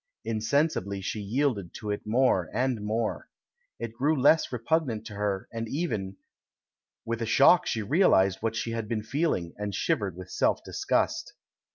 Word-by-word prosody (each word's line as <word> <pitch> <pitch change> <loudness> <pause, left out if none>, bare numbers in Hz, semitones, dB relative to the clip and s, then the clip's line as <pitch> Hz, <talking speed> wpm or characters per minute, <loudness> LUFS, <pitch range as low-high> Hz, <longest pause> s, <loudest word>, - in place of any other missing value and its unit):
Insensibly 110 - 0
she 100 +3 -4
yielded 105 -3 -1
to 105 -2 -4
it 105 - -4
more 110 -7 +2
and 125 -2 0
more. 110 +2 -2 0.5
It 115 0 -5
grew 145 +5 +1
less 155 +4 +4
repugnant 125 -2 -1
to 110 - -8
her, 100 -2 -2
and 115 -1 -4
even 110 - -3 0.9
With 115 0 -3
a 115 - -1
shock 140 +9 +5
she 110 - -1
realised 100 - +3
what 115 0 -1
she 115 - -2
had 115 -1 -3
been 110 -1 -2
feeling, 120 - -1
and 105 -2 -3
shivered 95 -4 0
with 95 -1 -9
self - - +1
disgust. - - -1
110 Hz, 160 wpm, -28 LUFS, 105-130 Hz, 0.9 s, shock